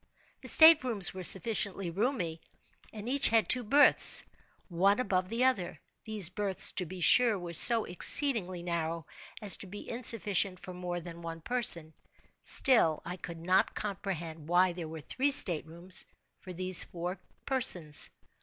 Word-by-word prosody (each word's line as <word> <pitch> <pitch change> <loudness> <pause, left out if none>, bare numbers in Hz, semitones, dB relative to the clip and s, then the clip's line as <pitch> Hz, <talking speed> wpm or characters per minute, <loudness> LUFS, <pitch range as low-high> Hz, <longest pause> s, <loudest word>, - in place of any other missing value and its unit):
The - - -13
state 320 -2 +5
rooms 215 -8 -1
were 185 - -10
sufficiently 195 -1 0
roomy, 185 - -5 0.5
and 215 0 -11
each 275 +2 +1
had 225 -1 -1
two 250 - +2
berths, 285 +6 +3 0.4
one 195 +5 -1
above 185 -6 -4
the 235 +2 -4
other. 255 -9 -3 0.3
These 210 -6 0
berths, 200 -2 -1
to 180 - -6
be 185 +2 -11
sure, 230 +5 +3
were 175 -2 -10
so 225 +7 +9
exceedingly 185 - +4
narrow 165 -2 -6 0.4
as 205 - +2
to 195 - -13
be 205 +3 -12
insufficient 210 -6 -2
for 185 - -13
more 180 -1 -8
than 170 0 -13
one 165 -1 -10
person; 170 -8 -3 0.5
still, 195 - 0
I 175 +1 -8
could 170 -2 -12
not 185 +1 -1
comprehend 170 -6 -8
why 180 +1 0
there 170 -2 -10
were 160 0 -11
three 260 - -4
state 175 - +3
rooms 170 +3 -4 0.3
for 185 - -14
these 185 0 +3
four 175 +2 -9 0.3
persons. 180 - -1
185 Hz, 155 wpm, -27 LUFS, 170-225 Hz, 0.5 s, so